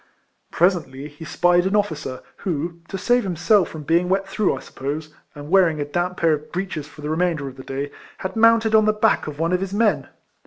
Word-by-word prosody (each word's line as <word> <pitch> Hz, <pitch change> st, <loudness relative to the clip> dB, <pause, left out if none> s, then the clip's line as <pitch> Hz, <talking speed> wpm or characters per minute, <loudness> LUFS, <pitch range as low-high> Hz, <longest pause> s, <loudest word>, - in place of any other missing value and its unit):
Presently 155 Hz, -6 st, 0 dB
he 150 Hz, +2 st, -12 dB
spied 175 Hz, +3 st, +3 dB
an 195 Hz, -, 0 dB
officer 155 Hz, -10 st, -2 dB
who, 170 Hz, -1 st, -3 dB
to 195 Hz, -, -5 dB
save 245 Hz, +6 st, +2 dB
himself 190 Hz, +2 st, +2 dB
from 155 Hz, -2 st, -8 dB
being 170 Hz, +4 st, +2 dB
wet 195 Hz, +1 st, +1 dB
through, 195 Hz, -7 st, 0 dB
I -, -, -7 dB
suppose, 150 Hz, +3 st, -6 dB, 0.2 s
and 145 Hz, +2 st, -9 dB
wearing 175 Hz, -5 st, +4 dB
a 145 Hz, -, -1 dB
damp 175 Hz, +4 st, -2 dB
pair 165 Hz, -2 st, +3 dB
of 150 Hz, 0 st, -5 dB
breeches 180 Hz, -5 st, -4 dB
for 150 Hz, -, -14 dB
the 150 Hz, -, -4 dB
remainder 160 Hz, -3 st, 0 dB
of 130 Hz, -, -8 dB
the 130 Hz, -, -10 dB
day, 140 Hz, +2 st, -4 dB, 0.3 s
had 190 Hz, 0 st, -5 dB
mounted 225 Hz, 0 st, +4 dB
on 215 Hz, -1 st, +6 dB
the 215 Hz, -, +3 dB
back 215 Hz, -4 st, +2 dB
of 150 Hz, -1 st, -6 dB
one 165 Hz, +3 st, 0 dB
of 180 Hz, -, +1 dB
his 195 Hz, +1 st, -3 dB
men. 220 Hz, 0 st, +2 dB
175 Hz, 220 wpm, -22 LUFS, 150-195 Hz, 0.3 s, on